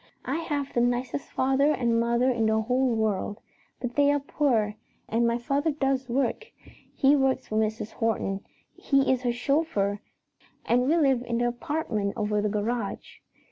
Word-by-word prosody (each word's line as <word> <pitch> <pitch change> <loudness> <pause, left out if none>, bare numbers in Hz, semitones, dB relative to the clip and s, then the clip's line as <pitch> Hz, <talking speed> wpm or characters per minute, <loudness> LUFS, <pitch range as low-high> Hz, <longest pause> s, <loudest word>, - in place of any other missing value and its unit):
I 270 +5 -1
have 290 -4 -3
the 240 - +2
nicest 245 +3 -1
father 270 +3 +2
and 235 -4 +1
mother 235 +2 +2
in 230 -3 +1
the 220 0 +2
whole 250 +2 +1
world, 215 -1 -1 0.4
but 245 -1 -4
they 285 0 +4
are 290 - +2
poor, 250 -7 0 0.3
and 235 +1 +1
my 235 0 +1
father 275 +6 0
does 270 -3 -1
work. 265 - -1 0.5
He 275 +2 +4
works 270 -2 +1
for 215 - -4
Mrs. 220 0 -1
Horton; 210 -4 -1 0.3
he 275 -2 +2
is 255 -1 +1
her 245 -1 0
chauffeur, 240 -6 0 0.7
and 250 +2 +2
we 320 +4 +3
live 270 -6 +3
in 235 -1 -2
the 240 +1 +1
apartment 240 -5 -2
over 210 -1 0
the 210 - 0
garage. 210 +1 -3
245 Hz, 170 wpm, -27 LUFS, 220-275 Hz, 0.7 s, they